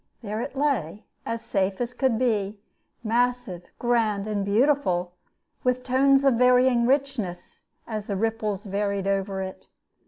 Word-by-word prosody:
There 215 +1 -3
it 275 - -5
lay, 240 - -1 0.2
as 230 0 -3
safe 195 -1 0
as 245 0 -2
could 250 -2 +1
be, 215 -4 0 0.4
massive, 240 -5 0
grand, 225 -4 +1
and 210 -2 -1
beautiful, 200 -5 +1 0.5
with 250 0 +1
tones 270 +2 +4
of 265 -4 +4
varying 250 -1 +4
richness 255 -10 -2 0.2
as 215 -2 -5
the 200 - -2
ripples 215 -1 -1
varied 200 -1 -2
over 195 0 -1
it. 190 0 -9
225 Hz, 135 wpm, -25 LUFS, 200-250 Hz, 0.5 s, tones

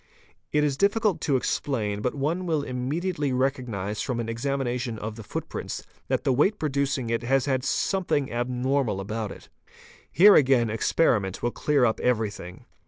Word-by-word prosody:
It 150 0 +2
is 140 -2 0
difficult 205 +1 +2
to 140 - +1
explain, 110 -5 -1
but 125 - -1
one 165 +6 -1
will 155 -3 0
immediately 145 +4 -2
recognise 125 -6 -1
from 125 -3 -2
an 115 -1 -3
examination 125 -1 -2
of 110 +1 -5
the 115 - -8
footprint - - -5 0.3
that - - 0
the 135 - +2
weight 190 - +2
producing 140 - -1
it 115 - 0
has 130 +2 +1
had 130 -2 0
something 145 -1 0
abnormal 125 -2 0
about 105 +1 -4
it. - - -12 0.6
Here 200 +7 +8
again 130 - +4
experiment 110 - +1
will 120 - +1
clear 145 -1 +2
up 110 - +1
everything. 110 -7 -2
130 Hz, 160 wpm, -26 LUFS, 115-145 Hz, 0.6 s, Here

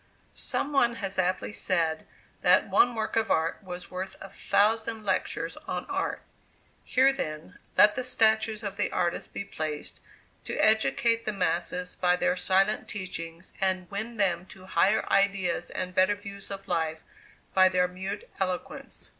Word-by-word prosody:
Some 290 - -1
one 240 -4 +3
has 195 -3 -3
aptly 185 +2 0
said, 165 -5 0 0.3
that - - +5
one 240 -1 +4
work 220 -1 -2
of 225 0 +2
art 160 +4 +1
was 180 -2 -8
worth 185 +1 -5
a 195 - -9
thousand 220 +3 +1
lectures - - -1
on - - -3
art. - - -2 0.6
Here, 265 +1 +4
then, 155 - -6 0.2
let 210 0 +7
the 255 - -3
statues 220 -2 +2
of 200 -1 -4
the 210 - 0
artist 175 -1 -1
be - - -4
placed, 155 -5 -4 0.5
to - - -3
educate 230 +1 +3
the 215 - 0
masses 180 0 -1
by 180 -1 +3
their 180 - +1
silent 195 +3 +2
teachings, 170 -3 -6
and 185 -2 0
win 220 +4 -4
them 185 -3 +1
to 185 -1 -14
higher 190 +3 +2
ideas 195 -2 +2
and 185 0 -4
better 185 +3 +4
views 200 -1 -9
of 195 -1 -7
life 160 -2 -1 0.5
by 185 0 +6
their 180 -1 +2
mute 190 +3 -6
eloquence. 185 -2 -4
195 Hz, 155 wpm, -28 LUFS, 180-215 Hz, 0.6 s, let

